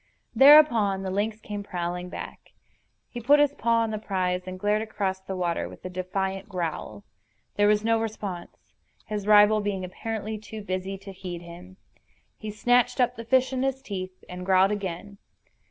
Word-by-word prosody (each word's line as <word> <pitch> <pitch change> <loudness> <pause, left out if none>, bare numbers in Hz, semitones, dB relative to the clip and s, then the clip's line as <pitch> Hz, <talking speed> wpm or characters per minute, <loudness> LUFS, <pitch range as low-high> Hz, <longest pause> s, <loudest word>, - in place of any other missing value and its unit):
Thereupon 240 -9 +6
the 190 - -3
lynx 210 +3 -1
came 205 -2 -6
prowling 180 -2 -4
back. - - -9 0.5
He 240 - -7
put 285 +5 +5
his 290 -1 +3
paw 230 -3 +1
on 225 - -2
the 215 - -3
prize, 185 -3 -2
and 185 0 -6
glared 210 +2 +1
across 200 -4 -2
the 190 0 -6
water 175 -2 -1
with - - -14
a 185 - -5
defiant 190 +1 -3
growl. 165 - -4 0.5
There 205 0 +3
was 210 0 +3
no 225 0 +2
response, 205 -5 -5 0.5
his 210 -1 -4
rival 210 0 +6
being 200 -2 -2
apparently 215 +3 -5
too 215 0 -9
busy 190 0 -3
to 195 +1 -10
heed 180 -2 -7
him. 180 +2 -12 0.6
He 215 - -7
snatched 245 +4 +2
up 250 0 +2
the 230 - -7
fish 260 +2 +2
in 255 - -1
his 270 0 0
teeth, 185 -7 -7
and 180 0 -7
growled 190 +1 +4
again. 200 0 -5
205 Hz, 175 wpm, -26 LUFS, 185-220 Hz, 0.6 s, Thereupon